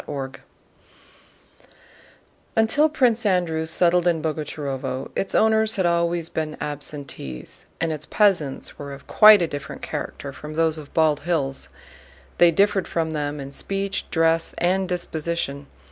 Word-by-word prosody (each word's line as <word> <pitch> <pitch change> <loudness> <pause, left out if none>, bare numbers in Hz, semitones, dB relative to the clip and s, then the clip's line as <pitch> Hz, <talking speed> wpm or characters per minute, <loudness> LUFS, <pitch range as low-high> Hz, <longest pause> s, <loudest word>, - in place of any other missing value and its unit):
CHAPTER 140 -2 -3
IX 130 - -11 2.2
Until 235 +8 +3
Prince 245 -6 +2
Andrew 175 -5 +1
settled 175 +2 +3
in 170 -2 +2
Boguchárovo 145 -4 -4
its 195 - -2
owners 220 0 +3
had 190 -3 +1
always 170 -1 +1
been 155 -2 -4
absentees, 140 - -6
and 165 -1 0
its 150 -1 -4
peasants 180 -10 +1
were 140 -1 -6
of 140 - -12
quite 215 -3 +7
a - - 0
different 145 -2 -7
character 140 -1 -5
from 150 +3 -9
those 160 -1 +2
of 145 -2 -12
Bald 155 -2 +3
Hills. 145 -6 -2 0.7
They 175 - +7
differed 195 +3 +2
from 165 -1 -1
them 150 -1 -3
in 140 0 -7
speech, 195 +4 -3
dress, 165 0 +2
and 185 +1 +1
disposition. 160 -5 -3
165 Hz, 140 wpm, -23 LUFS, 145-185 Hz, 2.2 s, quite